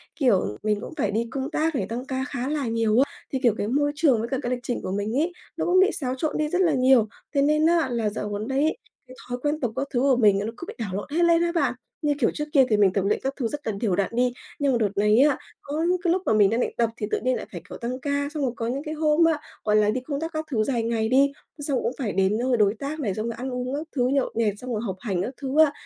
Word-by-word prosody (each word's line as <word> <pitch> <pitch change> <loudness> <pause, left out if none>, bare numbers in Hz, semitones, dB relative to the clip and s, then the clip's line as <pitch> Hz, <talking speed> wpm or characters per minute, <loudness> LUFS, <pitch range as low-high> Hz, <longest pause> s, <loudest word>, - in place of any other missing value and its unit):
kiểu, 195 - +2
mình 210 -1 0
cũng - - -7
phải 280 - 0
đi 225 +3 -1
công 270 -1 -3
tác 320 0 0
này, - - 0
tăng 240 +3 -4
ca 265 -1 -2
khá 265 -2 -3
là 295 -4 -1
nhiều 225 0 +2
á, 280 +2 +2 0.2
thì, 265 - +1
kiểu, 235 -4 +4
cái 205 - -2
môi 290 +5 +1
trường 290 -6 +3
với 230 - -2
cả 265 - 0
cái 245 - -3
lịch 250 - -1
trình 245 - -3
của - - -4
mình 205 +5 -1
ấy, 325 +5 +1 0.3
nó - - -1
cũng 365 +1 +4
bị 385 +2 +5
xáo 260 -3 -2
trộn 300 +4 -2
đi 305 - +1
rất 360 +3 +1
là 335 -4 +3
nhiều. 255 -4 +4 0.3
Thế 280 - +4
nên 305 +2 +3
á, 330 -4 +3
là 230 -3 0
dạo 210 0 -4
gần 205 +1 -4
đây 265 +1 0
ấy, 310 +2 +1 0.3
cái 255 - -12
thói 245 - -2
quen 295 +2 0
tập 245 -6 -1
các 275 +2 -2
thứ 245 - +2
của 270 -1 +4
mình 205 -4 +4
nó 215 +3 -3
cứ - - -7
bị - - -6
đảo 200 -5 -4
lộn 200 - -4
hết 335 +3 +2
lên 335 0 +4
á 340 0 +1
bạn. 335 - +1 0.3
Như 295 -1 +2
kiểu 230 - +3
trước 300 - -3
kia 270 -4 +6
thì 215 - +3
mình 200 -3 +4
tập 195 -1 0
luyện 205 - +1
các 270 - -1
thứ 250 -5 -1
rất 290 +3 -6
là 220 - 0
đều 200 -6 +1
đặn 195 -1 0
đi, 250 0 +2 0.3
nhưng 285 -2 +2
mà 245 - +2
đợt 215 -3 +1
này 210 +3 +4
á, 285 -1 +5 0.2
có 300 +3 -3
những 365 - +3
cái 345 -2 +3
lúc 370 - 0
mà - - +2
mình 205 -2 +5
đang 230 +3 0
định - - 0
tập 235 -1 +2
thì 210 - -3
tự - - +1
nhiên 255 +1 +1
lại - - -5
phải, 175 - -7
kiểu, - - -7
tăng 250 +2 -4
ca, 285 +1 -1
xong 300 -3 -2
rồi 255 - +1
có 230 - -3
những 265 +4 -2
cái 310 -1 -4
hôm 310 +1 +3
á, 325 -2 +2 0.2
gọi 210 -1 +2
là, 210 -1 +4
đi 250 +4 -1
công 280 +2 -4
tác 325 +2 -4
các 310 0 -3
thứ 220 -4 +2
dài 235 0 0
ngày 225 -1 0
đi, 275 +3 +4 0.3
xong 280 -3 -1
cũng - - 0
phải 235 -7 -1
đến 195 +2 +2
nơi 250 +1 +1
đối 205 -2 +4
tác 290 +3 -4
này, 215 -10 -1
xong 215 +3 -3
rồi 235 - -2
ăn 260 +2 -4
uống 250 +2 -3
các 305 +2 -4
thứ, 250 -2 +2
nhậu 275 0 +1
nhẹt, 220 -3 +1
xong 250 +3 -7
rồi 215 - -1
học 190 -4 -3
hành 195 -6 -2
các 240 +8 -3
thứ 275 +2 -1
á. 290 - -2
255 Hz, 320 wpm, -25 LUFS, 220-290 Hz, 0.3 s, kia